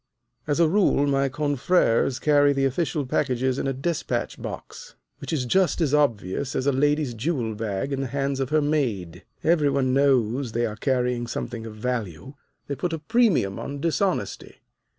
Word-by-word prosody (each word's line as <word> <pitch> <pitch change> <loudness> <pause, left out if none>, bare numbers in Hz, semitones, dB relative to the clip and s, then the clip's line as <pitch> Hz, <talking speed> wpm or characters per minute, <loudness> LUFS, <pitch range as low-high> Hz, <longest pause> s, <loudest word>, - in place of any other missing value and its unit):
As 145 +1 0
a 170 - +5
rule, 175 -5 +3
my 135 -1 +1
confreres 140 -2 +1
carry 145 -1 +4
the 135 0 +1
official 145 +2 -1
packages 130 -1 0
in - - -2
a - - +1
despatch 150 +5 -3
box, - - -8 0.2
which - - -6
is 145 -6 -1
just 180 +6 +2
as 150 -4 +1
obvious 130 -4 0
as 130 - -1
a 140 - +4
lady's 145 0 +1
jewel 120 -2 -2
bag 105 +4 -3
in 135 - -2
the 135 - -2
hands 135 +1 -2
of 135 -1 -1
her 155 0 +2
maid. 120 - -1 0.2
Every 155 -3 +3
one 135 -2 +1
knows 130 -3 +2
they 120 +1 +1
are 105 -2 -4
carrying 125 0 0
something 115 -1 -5
of 110 - -9
value. 110 - -4 0.3
They 140 - -4
put 165 +5 -3
a - - -1
premium 170 - +1
on 140 0 -5
dishonesty. 170 +5 -2
135 Hz, 175 wpm, -24 LUFS, 120-150 Hz, 0.3 s, a